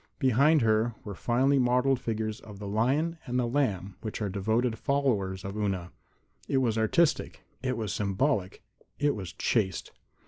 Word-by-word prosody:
Behind 140 +3 +4
her 110 +1 +2
were 105 - -6
finely 130 +7 +2
modeled 125 +1 +3
figures 110 -2 -3
of 105 -2 -11
the 100 0 -7
lion 135 +11 +1
and 125 0 -1
the 125 - +2
lamb 105 -8 -1
which 110 - -5
are 105 -2 -1
devoted 110 +4 0
followers 105 -10 0
of 95 +1 -5
Una. 95 -4 -2 0.6
It 135 - +1
was 120 -4 +2
artistic; 140 +9 +1 0.2
it 130 -2 -1
was 110 -5 -2
symbolic; 100 0 -1 0.3
it 145 0 +2
was 95 -5 -6
chaste. 100 -2 -1
115 Hz, 160 wpm, -28 LUFS, 100-130 Hz, 0.6 s, Behind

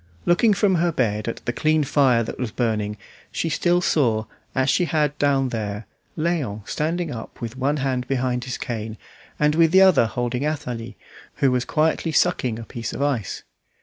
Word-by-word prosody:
Looking 205 +5 +4
from 190 -1 +3
her 175 0 +2
bed 110 -7 -1
at 115 - -5
the 120 - -1
clean 155 +2 +2
fire 135 -4 +3
that - - -7
was 125 -3 -2
burning, 105 -3 -1 0.3
she 165 - -2
still 175 +3 +2
saw, 115 -11 +2 0.3
as 130 0 +2
she 175 +6 +3
had 150 -2 0
down 135 -2 +2
there, 105 -2 -4 0.3
Léon 150 -11 -2
standing 165 +1 -1
up 115 -3 -8
with 115 0 -5
one 140 +3 0
hand 130 -2 -1
behind 125 -2 -1
his 130 - -4
cane, 110 -3 -5 0.4
and 150 0 +3
with 165 0 +4
the 190 +2 +6
other 180 -12 +6
holding 120 +3 -2
Athalie, 145 -7 -4 0.4
who 135 - +2
was 125 -1 0
quietly 160 +1 +1
sucking 130 -9 +1
a 115 - -7
piece 115 0 -6
of 140 - -2
ice. 130 -9 -2
130 Hz, 180 wpm, -23 LUFS, 115-155 Hz, 0.4 s, the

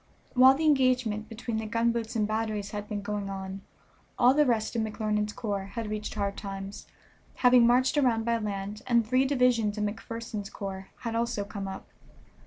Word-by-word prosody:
While 260 +1 +7
the 315 +3 -1
engagement 250 -7 +2
between 230 0 -4
the 220 0 -3
gunboats 230 +1 0
and 215 -2 +1
batteries 215 -2 -2
had 205 0 -5
been 205 -1 -3
going 205 -1 -3
on, 190 0 -6 0.6
all 250 +1 +6
the 300 0 +4
rest 225 -1 0
of 230 - +1
McClernand's 215 -1 -1
corps 205 -5 -3
had 225 -3 -3
reached 215 0 -4
Hard 200 -1 -1
Times, 195 0 -7 0.5
having 250 -1 +6
marched 255 +4 +3
around 230 -5 +2
by 235 -1 +1
land, 205 0 -4
and 235 -2 +3
three 255 +3 +3
divisions 250 -6 +2
of 210 - -1
McPherson's 215 -1 -5
corps 195 -1 -6
had 230 -2 -3
also 230 -2 -1
come 200 -1 -6
up. 190 0 -7
220 Hz, 180 wpm, -28 LUFS, 205-240 Hz, 0.6 s, While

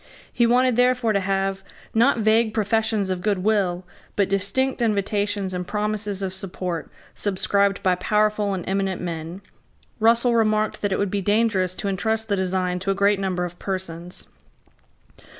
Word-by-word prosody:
He 235 - +3
wanted 250 0 +3
therefore 250 -2 +3
to 200 - +2
have, 195 0 -1 0.3
not 235 +4 +4
vague 220 0 +2
professions 215 -2 +1
of 180 -1 -2
good 200 -2 0
will, 190 -4 +1 0.3
but 200 -2 +1
distinct 220 +8 0
invitations 205 -2 0
and 180 -1 -4
promises 210 -1 -1
of 185 -1 -3
support 180 -3 -4 0.2
subscribed 200 0 0
by 185 - +3
powerful 210 +2 +1
and 180 - -6
eminent 195 -1 -1
men. 170 +2 -5 0.6
Russell 235 +2 +4
remarked 215 -2 +1
that 205 - 0
it 190 - +1
would 200 -2 -1
be 200 - -1
dangerous 205 -3 +1
to 190 - -4
entrust 220 +3 -1
the 200 - +2
design 185 -1 -1
to 195 - -4
a 195 - +2
great 200 0 +3
number 185 -2 -1
of 175 0 -9
persons. 180 -2 -5
200 Hz, 160 wpm, -23 LUFS, 185-215 Hz, 0.6 s, not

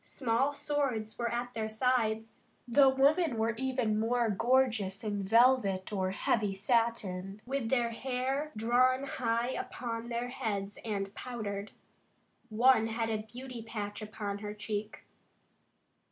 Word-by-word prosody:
Small 255 +2 0
swords 275 -7 -2
were 235 -1 0
at 245 +1 -3
their 220 -1 -2
sides. 225 -1 0 0.3
The 270 +3 +6
women 280 +1 +3
were 225 +1 +1
even 250 -4 0
more 230 0 +1
gorgeous 225 -3 +1
in 205 -2 -2
velvet 215 -2 +3
or 190 -2 0
heavy 200 +1 0
satin, 200 -3 0
with 260 -3 -2
their 240 -2 +2
hair 265 +5 -2
drawn 255 +4 +3
high 240 -3 -1
upon 235 -2 -4
their 240 +1 -2
heads 205 -5 -3
and 200 -3 -3
powdered. 210 -5 -5 0.8
One 230 +1 +4
had 225 0 -1
a 220 - +1
beauty 240 +2 -8
patch 210 -2 -5
upon 205 -1 -4
her 210 0 -6
cheek. 210 0 -4
230 Hz, 130 wpm, -31 LUFS, 210-255 Hz, 0.8 s, The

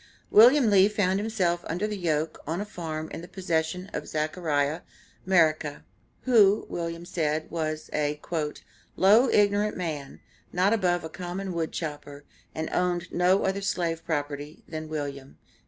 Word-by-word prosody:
William 240 +1 +7
Lee 195 0 +6
found 195 -2 +1
himself 185 -6 0
under 180 +6 -1
the 210 0 -3
yoke 160 -4 -1
on 165 +3 -2
a 205 - -3
farm 160 -6 -5
in - - -6
the 175 - -9
possession 180 0 -2
of 150 - -4
Zechariah 155 -1 -1 0.5
Merica, 155 -5 +2 0.4
who, 215 -5 +4
Wm. 170 0 -4
said, 155 -2 -2
was 155 -1 -3
a 150 0 -1 0.8
"low 215 +7 +5
ignorant 205 0 +2
man, 155 -6 -5 0.3
not 185 +4 +2
above 180 -5 +1
a - - -4
common 180 +4 -5
wood 165 -2 -2
chopper, 145 -2 -6 0.3
and 160 0 -2
owned 180 -1 -1
no 180 +2 +3
other 195 +1 0
slave 170 -4 -1
property 145 -1 -4
than 155 -1 -6
William." 140 -3 -5
170 Hz, 145 wpm, -27 LUFS, 155-190 Hz, 0.8 s, William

